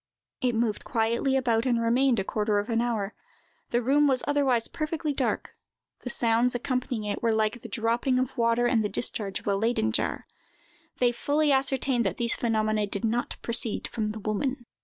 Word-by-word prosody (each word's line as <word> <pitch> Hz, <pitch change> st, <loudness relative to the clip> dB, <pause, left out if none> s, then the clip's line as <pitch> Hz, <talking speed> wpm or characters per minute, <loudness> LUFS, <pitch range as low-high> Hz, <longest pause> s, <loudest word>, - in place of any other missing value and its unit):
It 250 Hz, -3 st, +1 dB
moved 225 Hz, -2 st, 0 dB
quietly 235 Hz, +3 st, 0 dB
about, 240 Hz, -2 st, +1 dB
and 240 Hz, -2 st, +2 dB
remained 240 Hz, +2 st, +2 dB
a -, -, 0 dB
quarter 210 Hz, +1 st, 0 dB
of 205 Hz, +4 st, -2 dB
an 230 Hz, 0 st, +2 dB
hour. 220 Hz, -4 st, -2 dB, 0.6 s
The 240 Hz, 0 st, 0 dB
room 290 Hz, +4 st, +4 dB
was 260 Hz, -2 st, +1 dB
otherwise 270 Hz, -5 st, +2 dB
perfectly 310 Hz, -1 st, -3 dB
dark; -, -, -2 dB, 0.4 s
the 250 Hz, -, -6 dB
sounds 235 Hz, +1 st, +2 dB
accompanying 250 Hz, -2 st, -2 dB
it 205 Hz, -1 st, -3 dB
were 230 Hz, -, +2 dB
like 220 Hz, +2 st, 0 dB
the -, -, -9 dB
dropping 240 Hz, +2 st, 0 dB
of 255 Hz, 0 st, -1 dB
water 235 Hz, 0 st, +2 dB
and 235 Hz, -2 st, +2 dB
the 210 Hz, -, -1 dB
discharge 200 Hz, -4 st, -1 dB
of -, -, -19 dB
a 200 Hz, -, +1 dB
Leyden 215 Hz, -, +1 dB
jar. 250 Hz, -, -2 dB, 0.7 s
They 245 Hz, -1 st, +3 dB
fully 290 Hz, +5 st, +1 dB
ascertained 265 Hz, -2 st, +2 dB
that 185 Hz, -, -3 dB
these 235 Hz, -1 st, +2 dB
phenomena 215 Hz, -2 st, 0 dB
did 200 Hz, +2 st, -2 dB
not 235 Hz, +2 st, -1 dB
proceed 235 Hz, -1 st, 0 dB
from 215 Hz, -2 st, -2 dB
the 215 Hz, -, -7 dB
woman. 240 Hz, +5 st, -2 dB
235 Hz, 185 wpm, -27 LUFS, 220-255 Hz, 0.7 s, room